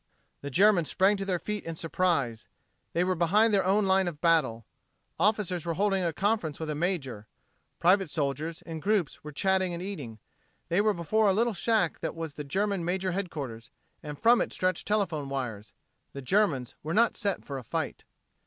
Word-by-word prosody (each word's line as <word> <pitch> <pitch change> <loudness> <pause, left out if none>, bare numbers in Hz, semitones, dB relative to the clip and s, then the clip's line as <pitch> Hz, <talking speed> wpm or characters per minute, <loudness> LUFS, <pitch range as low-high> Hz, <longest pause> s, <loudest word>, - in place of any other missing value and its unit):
The 140 - -5
Germans 185 +1 +4
sprang 195 +2 +3
to 195 - -4
their 185 -2 0
feet 210 +3 -4
in 165 0 -5
surprize. 155 -9 -1 0.5
They 170 - +2
were 185 +1 +1
behind 205 +6 +3
their 195 - +4
own 200 +2 +2
line 190 -1 +3
of 160 -4 -5
battle. 150 -10 +2 0.5
Officers 190 -3 +1
were 170 -1 -2
holding 195 0 +1
a 170 - +1
conference 190 -5 -1
with 160 -1 -3
a - - -1
major. 145 - -2 0.5
Private 190 +1 +3
soldiers, 150 +2 -3
in 165 -1 -6
groups, 195 -3 0
were 150 - -7
chatting 190 +3 +1
and 170 - -6
eating. 145 - -6 0.5
They 175 +4 +3
were 215 0 +2
before 210 +6 +1
a 195 - +4
little 230 +3 +1
shack 210 -2 +1
that - - -4
was 165 -3 -5
the 150 - -6
German 195 +5 -1
major's 185 +1 -1
headquarters, 140 - -5 0.3
and 150 -1 -7
from 235 +6 +5
it - - -2
stretched 185 0 -1
telephone 175 -9 0
wires. 115 -6 -4 0.4
The 140 - -7
Germans 135 - +1
were 160 +4 -3
not 230 +1 +4
set 200 -3 -2
for 140 -2 -5
a - - -10
fight. - - -4
175 Hz, 190 wpm, -28 LUFS, 150-200 Hz, 0.5 s, from